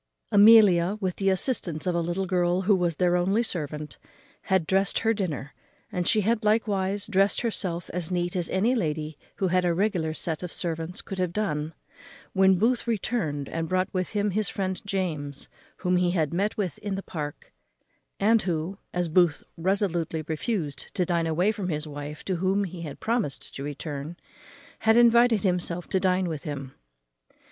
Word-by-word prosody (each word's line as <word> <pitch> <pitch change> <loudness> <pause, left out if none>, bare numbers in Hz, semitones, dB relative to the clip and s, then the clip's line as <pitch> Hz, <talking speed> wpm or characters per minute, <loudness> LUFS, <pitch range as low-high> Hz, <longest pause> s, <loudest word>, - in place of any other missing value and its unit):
_ - - +2
Amelia, 205 -3 +7
with 185 -3 -2
the 195 -1 +2
assistance 190 - 0
of 180 - +1
a 170 - +1
little 175 +3 -1
girl, 180 0 +1
who 200 +2 +4
was 175 -3 0
their 180 +2 +2
only 195 +6 +2
servant, 150 -7 -4 0.5
had 190 -4 +2
drest 195 +3 +1
her 225 - +4
dinner, 150 - -3 0.4
and 180 -1 -1
she 215 - +4
had 225 +2 +1
likewise 205 -2 +1
drest 195 -1 +2
herself 185 -7 -2
as 175 -2 -3
neat 175 -1 -1
as 175 -2 -1
any 210 +7 +2
lady 155 -8 -2 0.2
who 190 - 0
had 185 +1 +2
a 175 -1 +1
regular 175 -5 0
sett 160 -2 -3
of 180 -2 -5
servants 165 0 -3
could 195 - -6
have 180 -2 0
done, 160 -6 -2 0.6
when 190 -1 +5
Booth 235 +5 +1
returned, 190 - -1
and 165 -1 -3
brought 185 +1 0
with 185 -1 -1
him 205 0 +1
his 210 +2 0
friend 190 -1 -3
James, 155 -8 -3 0.3
whom 180 -1 +1
he 180 0 +2
had 165 -4 0
met 200 +4 0
with 205 0 -2
in 205 -2 -3
the 195 - -5
Park; 145 - -6 0.7
and 220 +2 +4
who, 175 +2 -3 0.2
as 175 -1 +1
Booth 165 -2 +3 0.2
absolutely 175 -4 0
refused 155 - -3
to 185 -3 +1
dine 170 -1 0
away 175 +6 +2
from 200 -4 -4
his 150 -1 -2
wife, 145 0 -7
to 185 -2 -1
whom 190 +3 +1
he 180 -2 -6
had 150 -4 -7
promised 225 - -2
to - - -7
return, 145 +2 -5 0.6
had 225 +1 +4
invited 235 -2 +5
himself 180 -2 0
to 190 - +2
dine 185 0 +1
with 155 -4 -4
him. 140 -3 -6
180 Hz, 180 wpm, -26 LUFS, 165-200 Hz, 0.7 s, Amelia